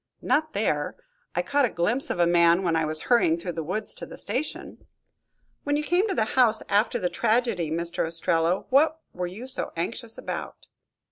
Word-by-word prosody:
"Not 310 +1 +1
there. - - -1 0.4
I - - +1
caught 285 0 +2
a - - 0
glimpse 225 +11 0
of - - -2
a 175 - +4
man 170 +1 +4
when 170 -2 +1
I 160 -1 +2
was 155 0 -2
hurrying 200 -10 +3
through 175 +1 -5
the 165 -1 -4
woods 185 +7 -2
to - - -7
the - - -10
station." 255 +9 -4 0.8
"When 290 0 +1
you 300 - -1
came 355 +7 +2
to 385 - -1
the 220 - +2
house, 230 -4 +3
after 205 +3 +2
the 180 - 0
tragedy, 210 -1 0
Mr. 170 +1 -2
Ostrello, 165 +2 +1
what 310 +4 +4
were 180 0 -3
you 200 +8 -8
so 260 - -4
anxious 225 +7 -4
about?" - - -6
200 Hz, 195 wpm, -26 LUFS, 170-255 Hz, 0.8 s, a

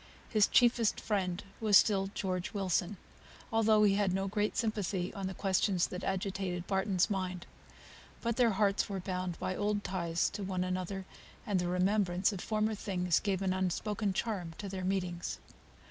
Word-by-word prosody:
His 215 -3 +4
chiefest 235 -2 +3
friend 190 -4 -1 0.2
was 210 -3 +6
still 195 -2 +3
George 185 -1 -2
Wilson, 190 0 0 0.6
although 220 -1 +4
he 200 -2 +5
had 195 -2 +1
no 195 0 -1
great 210 +1 -1
sympathy 205 -5 -1
on 195 -3 -4
the 190 - -5
questions 190 -1 +2
that 180 - -6
agitated 190 -2 -2
Barton's 190 -1 +1
mind. 185 -3 -3 0.8
Still 235 - 0
their 235 0 +3
hearts 200 +1 +1
were 195 -1 -3
bound 180 -2 -3
by 185 - -2
old 205 +1 0
ties 170 -3 0
to - - -6
one 185 -2 -1
another, 185 +1 -3 0.4
and 200 -3 +1
the 175 - -1
remembrance 185 +1 +2
of 185 - -5
former 215 0 0
times 180 -5 0
gave 195 -2 -1
an 185 -1 +1
unspoken 195 +3 -1
charm 185 -5 -3
to 205 - -5
their 190 -1 -5
meetings. 180 -2 -2
195 Hz, 165 wpm, -32 LUFS, 180-210 Hz, 0.8 s, was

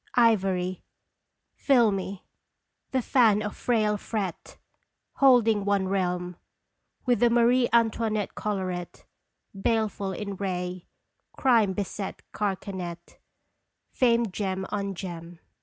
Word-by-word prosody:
Ivory, 190 -6 +2 0.7
filmy, 205 -8 +1 0.6
the 260 -2 0
fan 220 -5 +4
of 210 - -4
frail 215 -3 +1
fret 200 -4 -5 0.6
Holding 230 -6 +5
one 200 -1 +1
realm 180 -2 -1 0.7
With 245 -2 +2
the 240 - +5
Marie 240 +1 +3
Antoinette 225 -3 +1
collaret 185 -4 -4 0.5
Baleful 205 -1 -1
in 200 0 -5
ray, 180 -2 -4 0.5
crime 230 -7 +3
beset 200 0 -5
carcanet 185 -4 -4 0.7
Famed 235 -5 +2
gem 190 -2 -2
on 200 -2 -2
gem. 170 -2 -7
200 Hz, 95 wpm, -26 LUFS, 185-230 Hz, 0.7 s, Holding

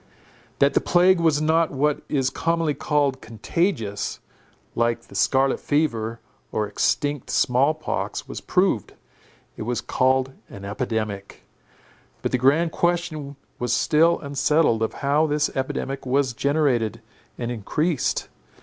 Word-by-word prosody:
That 140 +2 +3
the - - +3
plague 180 +1 +4
was 155 -3 +2
not 160 +1 +3
what 145 +2 0
is 135 -2 +1
commonly 165 -2 0
called 145 -3 0
contagious, 115 - -2 0.5
like 115 0 +1
the - - -18
scarlet 135 +7 +2
fever, 115 -7 -1 0.3
or 105 - 0
extinct 145 +6 -1
small 135 +5 +2
pox, 155 - -4
was - - -6
proved. - - 0 0.6
It - - -7
was 120 +1 -1
called 130 +1 +1 0.2
an 100 0 -9
epidemic. 105 -2 -4 0.8
But - - -1
the 130 - +1
grand 150 +6 +3
question 170 -5 -1 0.2
was 125 -1 0
still 160 +7 +3
unsettled 140 -4 +2
of 110 - 0
how 150 +3 +3
this 150 0 0
epidemic 135 +1 -3
was 130 -1 +1
generated 140 -5 0 0.4
and 120 0 -3
increased. 145 - -1
140 Hz, 130 wpm, -23 LUFS, 120-155 Hz, 0.8 s, plague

